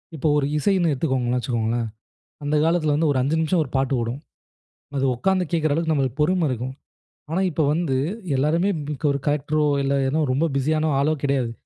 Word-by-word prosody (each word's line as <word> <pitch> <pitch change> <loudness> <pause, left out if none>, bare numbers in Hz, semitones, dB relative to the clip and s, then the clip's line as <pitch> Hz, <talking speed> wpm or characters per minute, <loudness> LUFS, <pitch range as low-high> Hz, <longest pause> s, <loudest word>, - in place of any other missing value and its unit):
இப்போ 155 0 -1
ஒரு 145 - +1
இசைன்னு 175 +1 +2
எடுத்துக்கோங்கன்னு 130 -3 0
வச்சுக்கோங்களேன், 115 -1 -1 0.6
அந்த 145 +1 0
காலத்தில 160 -3 +2
வந்து 155 +1 +2
ஒரு 140 - 0
5 140 +5 +1
நிமிஷம் 160 +2 +2
ஒரு 135 - -11
பாட்டு 135 0 0
ஓடும். 115 +4 -3 0.8
அது 135 - +1
உக்கார்ந்து 185 +8 +1
கேக்கிற 155 -2 +1
அளவுக்கு 160 +1 0
நமக்கு 135 -5 0
பொறும 175 +3 +2
இருக்கும். 130 +2 -4 0.6
ஆனா 180 +4 +1
இப்போ 155 0 0
வந்து 155 -5 0 0.4
எல்லோருமே 165 +8 +2
இப் 150 -1 -5
ஒரு 140 - -1
கலெக்டரோ 150 +1 +1 0.2
இல்ல 135 0 +1 0.2
ஏதோ 150 +4 0
ரொம்ப 140 +6 +1
பிஸியான 155 +3 +1
ஆளோ 150 +3 +2
கிடையாது. 135 -4 0
145 Hz, 175 wpm, -23 LUFS, 130-160 Hz, 0.8 s, இசைன்னு